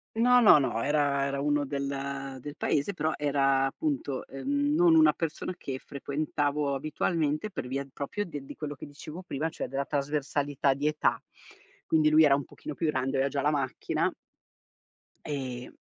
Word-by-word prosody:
No, 245 +2 +5
no, 210 -8 +9
no, 125 -5 0
era 140 0 +2
era 140 0 -2
uno 145 0 +1
del 140 -1 -4
del 145 +2 -7
paese, 150 +7 0
però 155 -1 0
era 135 -2 +2
appunto, 145 - -2
ehm, 285 - -1
non 335 +1 +5
una 320 0 +6
persona 165 +2 -3
che 135 -6 -5
frequentavo 145 +1 -2
abitualmente 155 +5 -1
per 155 - -5
via 135 +2 -3
proprio 205 +9 -3
de 145 -6 -7
di 135 - -10
quello 150 -1 -5
che 140 - -10
dicevo 150 +4 -9
prima, 160 -3 -3
cioè 160 - -5
della 135 +2 -2
trasversalità 145 -1 0
di 140 +2 -1
età. 150 0 +1 0.6
Quindi 155 -1 +3
lui 155 +1 +6
era 145 -2 +6
un 140 - -2
pochino 150 - -8
più 160 - -1
grande, 135 -2 0
aveva 135 +1 +2
già 140 0 -1
la 145 +2 +2
macchina 135 -3 -1 1.1
ehm, 130 -4 -4
145 Hz, 170 wpm, -29 LUFS, 140-155 Hz, 1.1 s, no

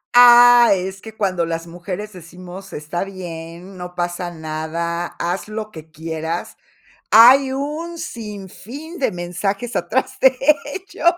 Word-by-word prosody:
Ah, 245 0 +8
es 190 +1 -5
que 220 -1 -11
cuando 185 -4 0
las 165 0 -3
mujeres 180 +5 -7
decimos: 180 +2 -11
"Está 150 +5 -4
bien, 180 -1 -9
no 180 0 -8
pasa 175 0 -3
nada, 165 +1 -4
haz 175 +4 -3
lo 215 0 -6
que 160 0 -11
quieras". 160 +1 -5 0.6
Hay 260 +4 +8
un 305 +5 -4
sinfín 230 - -8
de 265 - 0
mensajes 195 +6 -3
atrás 260 0 -1
de 260 -1 +5 0.3
ello. 360 +6 -8
190 Hz, 130 wpm, -20 LUFS, 170-240 Hz, 0.6 s, Ah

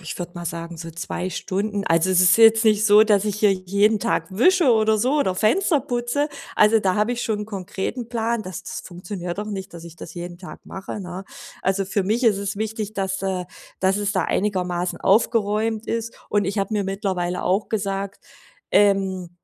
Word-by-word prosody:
ich 170 0 -7
würde 175 0 -6
mal 175 - -7
sagen, 170 0 -5
so 165 0 -7
2 175 +2 -4
Stunden. 200 +2 -2
Also, 165 +3 +3
es 185 -1 +4
ist 185 +2 +6
jetzt 225 0 +6
nicht 215 0 +4
so, 210 +1 +7
dass 205 -2 +3
ich 210 -1 -1
hier 210 -2 +4
jeden 200 +3 +2
Tag 235 - 0
wische 280 - +4
oder 220 -1 +3
so 255 +6 +1
oder 190 -10 +1
Fenster 290 - +2
putze, 245 +5 -1 0.3
also, 215 +1 +5
da 190 -2 +1
habe 215 +4 +1
ich 240 - -3
schon 215 -2 -1
'n 210 - -5
konkreten 205 +4 -5
Plan. 230 -1 -1
Das 185 -4 -7
das - - -6
funktioniert 175 0 -7
doch 210 - -3
nicht, 195 -3 -6
dass 170 0 -9
ich 170 -1 -11
das - - -10
jeden 175 0 -7
Tag 185 - -10
mache, 195 +2 -7
ne? 185 +1 -7 0.4
Also 195 +1 +1
für 200 0 0
mich 225 +6 0
ist 205 -4 +4
es 200 +1 -3
wichtig, 215 -1 -3
dass 195 -1 -2
äh, 185 -2 -2 0.4
dass 190 +1 +2
es 205 0 -1
da 190 - +1
einigermaßen 180 -3 -1
aufgeräumt 215 +1 +1
ist, 230 0 -3
und 205 -1 +1
ich 195 +2 -2
habe 195 +2 -1
mir 205 -2 0
mittlerweile 190 -3 -2
auch 195 +3 +1
gesagt: 200 -2 -3 0.5
„Ähm, 190 -3 +2
200 Hz, 205 wpm, -22 LUFS, 185-220 Hz, 0.5 s, so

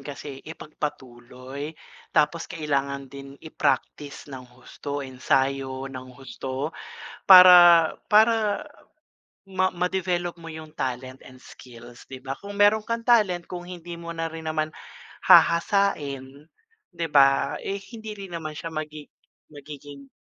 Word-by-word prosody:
kasi 135 0 -9
ipagpatuloy 135 -2 -8 0.3
tapos 170 +3 0
kailangan 140 -3 -2
din 140 +1 -12
i-practice 145 -1 -3
ng 130 -2 -9
husto, 140 +3 -7
ensayo 135 0 -1
ng 130 0 -9
husto 130 +3 -6 0.6
para 175 -3 +9 0.2
para 220 +2 +3 0.8
ma 185 -1 0
ma-develop 180 -1 -2
mo 165 -1 -10
yung 155 0 -11
talent 130 0 -5
and 130 0 -15
skills, 120 -2 -14
di 130 - -7
ba? 135 +1 -6
Kung 200 0 -10
meron 210 +1 +4
kang 230 +1 -4
talent, 200 -8 +3
kung 175 -1 -7
hindi 175 -1 -9
mo 170 0 -8
na 165 0 -3
rin 160 0 -9
naman 155 -1 -3 0.5
hahasain, 150 -6 +2 0.4
di 170 -2 -4
ba, 135 -2 +3
eh, 200 +1 -3 0.2
hindi 220 -1 -8
rin 195 -4 -8
naman 155 -2 -5
siya 165 -1 -7
magi 155 -1 -6 0.4
magiging 145 -1 -12
155 Hz, 125 wpm, -24 LUFS, 135-175 Hz, 0.8 s, para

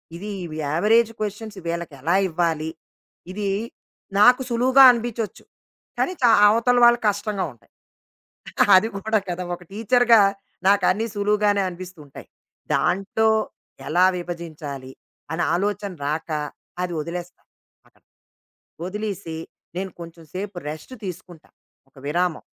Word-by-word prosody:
ఇది 200 +5 -7 0.2
ఇవి 155 -2 -7
average 220 +8 +3
questions 210 0 -5
వీళ్ళకి 170 -2 -3
ఎలా 165 +6 +1
ఇవ్వాలి? 160 -2 -1 0.6
ఇది 200 +1 -3 0.7
నాకు 250 +4 +7
సులువుగా 255 +3 +5
అనిబించొచ్చు. 235 -2 -4 0.5
కానీ - - +1
చ - - -4 0.2
అవతల 235 +3 +3
వాళ్ళకి 240 0 +5
కష్టంగా 205 -1 -2
ఉంటాయి. 115 - -28 1.1
అది 215 - +2
కూడా 220 +2 +1
కదా! 180 +1 -3
ఒక 180 - -16
టీచర్‌గా 230 +2 +4 0.5
నాకు 200 0 +4
అన్నీ 220 +4 -1
సులువుగానే 205 0 +2
అనిపిస్తూ 180 -1 -10
ఉంటాయి. 140 - -12 0.5
దాంట్లో 200 +4 +1 0.6
ఎలా 175 +4 +4
విభజించాలి, 155 -6 -7 0.4
అనే 165 +2 -1
ఆలోచన 200 +1 -2 0.2
రాక 155 +3 -3 0.5
అది 175 - -3
వదిలేస్తాను 175 +2 -8 0.4
అక్కడ. - - -30 0.8
వదిలీసి 195 -4 -4 0.4
నేను 190 -1 -3
కొంచెం 165 0 -11
సేపు 195 0 -5
రెస్ట్ 155 +12 -9
తీసుకుంటా 175 -3 -9 0.4
ఒక - - -47
విరామం. 175 +2 0
190 Hz, 115 wpm, -23 LUFS, 170-215 Hz, 1.1 s, నాకు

